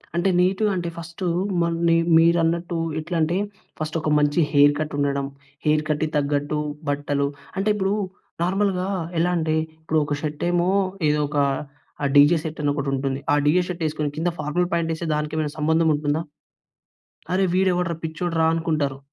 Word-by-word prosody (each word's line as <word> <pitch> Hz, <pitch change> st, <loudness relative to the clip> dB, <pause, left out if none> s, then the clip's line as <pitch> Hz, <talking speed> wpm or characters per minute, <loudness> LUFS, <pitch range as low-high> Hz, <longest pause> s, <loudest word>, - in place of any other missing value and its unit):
అంటే 175 Hz, +3 st, +2 dB
నీట్‌గా 190 Hz, +4 st, +2 dB
అంటే 175 Hz, -2 st, -2 dB
ఫస్టూ 170 Hz, +2 st, -5 dB, 0.3 s
మ -, -, +3 dB, 0.2 s
న -, -, +4 dB, 0.3 s
మీరన్నట్టు 170 Hz, +1 st, +2 dB, 0.2 s
ఎట్లాంటే 165 Hz, +1 st, 0 dB, 0.4 s
ఫస్ట్ 155 Hz, +1 st, -2 dB
ఒక 155 Hz, -, -1 dB
మంచి 145 Hz, +3 st, +2 dB
హెయిర్ 145 Hz, 0 st, +6 dB
కట్ 155 Hz, -1 st, -3 dB
ఉండడం. 140 Hz, -1 st, 0 dB, 0.4 s
హెయిర్ 150 Hz, 0 st, +3 dB
కట్‌కి 155 Hz, +1 st, 0 dB
తగ్గట్టు 145 Hz, +1 st, 0 dB, 0.3 s
బట్టలు. 145 Hz, 0 st, 0 dB, 0.3 s
అంటే 195 Hz, +2 st, +1 dB
ఇప్పుడు 195 Hz, -1 st, 0 dB, 0.5 s
నార్మల్‌గా 190 Hz, 0 st, 0 dB, 0.3 s
ఎలా 175 Hz, +2 st, +2 dB
అంటే 160 Hz, -1 st, 0 dB, 0.3 s
ఇప్పుడు 160 Hz, 0 st, +1 dB
ఒక 145 Hz, -, -2 dB
షర్ట్ 150 Hz, -1 st, -4 dB
ఏమో 175 Hz, +1 st, +2 dB, 0.4 s
ఏదో 150 Hz, -, +2 dB
ఒక 145 Hz, -, -4 dB, 0.8 s
డీజే 145 Hz, +4 st, +7 dB
షర్ట్ 160 Hz, 0 st, -5 dB
అని 145 Hz, -, +1 dB
ఒకటి 140 Hz, -1 st, -2 dB
ఉంటుంది. 135 Hz, 0 st, -1 dB
ఆ -, -, +5 dB
డీజే 160 Hz, +5 st, +4 dB
షర్ట్ 175 Hz, -2 st, -4 dB
వేసుకొని 155 Hz, -1 st, -1 dB
కింద 165 Hz, +3 st, +1 dB
ఫార్మల్ 155 Hz, +4 st, 0 dB
ప్యాంట్ 170 Hz, -1 st, 0 dB
వేస్తే 165 Hz, +1 st, -5 dB
దానికి 150 Hz, 0 st, -3 dB
ఏమైనా 150 Hz, -2 st, -1 dB
సంబంధం 160 Hz, +2 st, +2 dB
ఉంటుందా? 145 Hz, +2 st, 0 dB, 1.1 s
అరే! 190 Hz, +1 st, +2 dB
వీడు 190 Hz, 0 st, +3 dB
ఎవడ్రా 175 Hz, -1 st, -1 dB
పిచ్చోడురా 165 Hz, 0 st, -1 dB
అనుకుంటారు. 155 Hz, -4 st, -1 dB
160 Hz, 160 wpm, -23 LUFS, 150-175 Hz, 1.1 s, డీజే